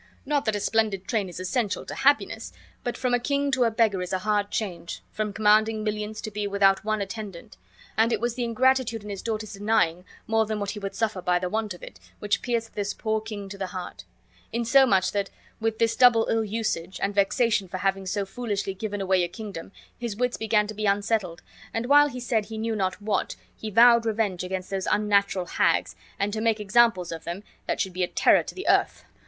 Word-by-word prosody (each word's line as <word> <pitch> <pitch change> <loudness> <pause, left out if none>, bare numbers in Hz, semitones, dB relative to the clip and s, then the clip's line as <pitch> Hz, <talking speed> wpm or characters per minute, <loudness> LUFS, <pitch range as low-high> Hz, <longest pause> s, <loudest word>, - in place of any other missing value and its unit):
Not 290 0 0
that 220 -2 +1
a - - -1
splendid 205 -3 0
train 210 -6 0
is 175 - -8
essential 200 +3 -1
to - - -6
happiness, 285 +1 +1 0.3
but 245 - -3
from 250 -1 0
a 245 - +4
king 280 +3 0
to 260 -2 +3
a - - +3
beggar 220 -4 +2
is 180 - -4
a 190 - +1
hard 205 +1 0
change, 175 -6 -4
from 215 -1 -2
commanding 215 +1 +3
millions 210 0 -3
to 215 - -5
be 205 0 -2
without 195 0 +3
one 215 -1 -1
attendant; 210 -1 -8 0.4
and 225 +2 +4
it 225 - +1
was 240 +1 -1
the 245 0 -3
ingratitude 235 -1 +1
in 210 - -7
his 195 - -5
daughters' 215 -2 -4
denying 195 -4 +1 0.2
more 225 -1 +2
than 215 -1 -2
what 200 -1 -2
he 210 - -6
would 195 -1 -5
suffer 220 -4 -1
by 180 0 +2
the 180 0 -2
want 215 -1 -2
of - - -16
it, 95 - -10 0.2
which 205 - -1
pierced 230 -2 -2
this 205 -1 -3
poor 220 -1 -1
king 210 -2 -7
to 195 0 -9
the 190 - -2
heart; 180 -1 -7 0.5
in 235 0 -1
so 265 +3 +6
much 190 -4 +3
that, 200 -1 -1 0.3
with 225 0 -1
this 225 0 +2
double 235 -2 +6
ill 225 0 +2
usage, 205 -5 -3
and 200 - -1
vexation 205 0 +2
for 185 - -5
having 195 0 -1
so 200 +1 -1
foolishly 205 -2 -3
given 205 +1 -4
away 190 -1 +2
a - - 0
kingdom, 200 -2 -8 0.3
his 235 -4 -4
wits 250 +2 0
began 220 -1 +2
to 215 - -6
be 215 0 -2
unsettled, 200 -4 0 0.3
and 225 +1 -1
while 290 +3 +6
he 250 -2 -7
said 235 -3 0
he 220 +1 -7
knew 225 0 -1
not 190 -2 -1
what, 205 -2 -1 0.2
he 220 - -6
vowed 235 +2 +6
revenge 210 -5 0
against 185 0 -4
those 195 -1 -2
unnatural 200 -3 +2
hags - - +1 0.2
and 200 +1 -1
to 220 - -2
make 225 -1 +2
examples 210 -4 +3
of 165 -1 -6
them 175 +4 -5 0.2
that - - -1
should 190 - -1
be 185 - -3
a 180 - +2
terror - - +4
to - - -9
the 380 - -6
earth! - - +2
210 Hz, 225 wpm, -26 LUFS, 195-225 Hz, 0.5 s, so